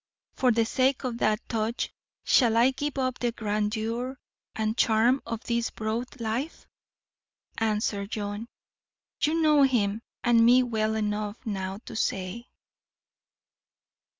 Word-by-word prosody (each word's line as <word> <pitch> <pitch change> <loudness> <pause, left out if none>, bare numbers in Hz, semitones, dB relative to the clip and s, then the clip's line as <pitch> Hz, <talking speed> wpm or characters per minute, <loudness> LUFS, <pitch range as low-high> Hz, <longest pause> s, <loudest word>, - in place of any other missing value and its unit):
For 255 -1 +3
the 230 0 +2
sake 260 +3 +1
of 240 -2 -3
that 215 -2 +1
touch 225 +1 -2 0.3
shall 230 -4 +4
I 245 +3 +5
give 285 +2 -4
up 255 -2 -1
the 240 -1 0
grandeur 220 +4 -2 0.4
and 220 0 -1
charm 235 +4 +3
of 230 0 -4
this 235 -1 0
broad 230 +5 -4
life? 235 +7 -3 0.9
Answer, 210 -2 0
John. 205 +1 -4 0.7
You 315 +2 +2
know 300 -2 +5
him 225 -6 +2 0.2
and 235 -2 +5
me 250 +2 +6
well 220 -2 0
enough 210 +1 -2
now 195 -3 -3
to - - -8
say. 195 +3 -2
230 Hz, 125 wpm, -27 LUFS, 215-250 Hz, 0.9 s, me